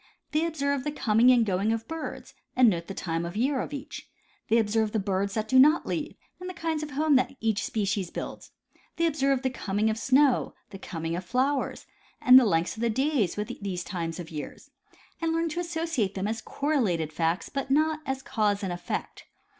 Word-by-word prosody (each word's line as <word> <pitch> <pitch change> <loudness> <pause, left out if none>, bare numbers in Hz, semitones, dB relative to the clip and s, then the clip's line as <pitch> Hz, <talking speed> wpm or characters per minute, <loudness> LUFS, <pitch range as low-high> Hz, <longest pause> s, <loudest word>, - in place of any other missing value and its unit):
They 310 +2 +1
observe 280 -4 -1
the 295 - -2
coming 235 -4 +3
and 240 -3 +4
going 200 +2 +1
of 225 0 -2
birds 325 0 -6 0.2
and 250 -3 +6
note 170 -2 -4
the 195 - -6
time 165 -1 -2
of 170 0 -5
the 215 - -1
year 265 0 +1
of - - -6
each; 285 0 -7 0.4
they 225 - +4
observe 220 -1 +1
the 220 - +1
birds 195 0 -1
that 220 -1 -1
do 260 +3 +5
not 300 +5 +6
leave 310 -2 -3 0.2
and 365 0 -6
the 365 - -7
kinds 325 -2 -2
of 305 - -5
homes 295 0 +3
that 255 +1 0
each 225 -1 0
species 195 -4 -1
build; - - -7 0.5
they 335 - +1
observe 275 -4 +1
the 260 - 0
coming 210 -2 0
of 220 - -4
snow, 270 0 +3 0.2
the 195 - -9
coming 165 -2 -4
of 180 - -4
flowers, 260 +8 -1 0.3
and 255 +1 +9
the 255 - +2
length 165 -4 +1
of - - -6
the 235 - +2
days 260 - +1
with 210 0 -3
each - - -8
of - - -13
these 180 -3 -3
times 170 -2 -4
of 170 -2 -8
year, 150 -2 -6 0.6
and 325 0 0
learn 330 0 0
to 320 - -4
associate 325 - -1
them 195 +1 -2
as 225 +1 -3
correlated 210 - -1
facts, 165 +3 0
but 275 -1 -4
not 310 +2 +2
as 265 -2 -3
cause 210 -5 0
and 185 -2 -2
effect. 175 0 -5
230 Hz, 215 wpm, -27 LUFS, 195-285 Hz, 0.6 s, and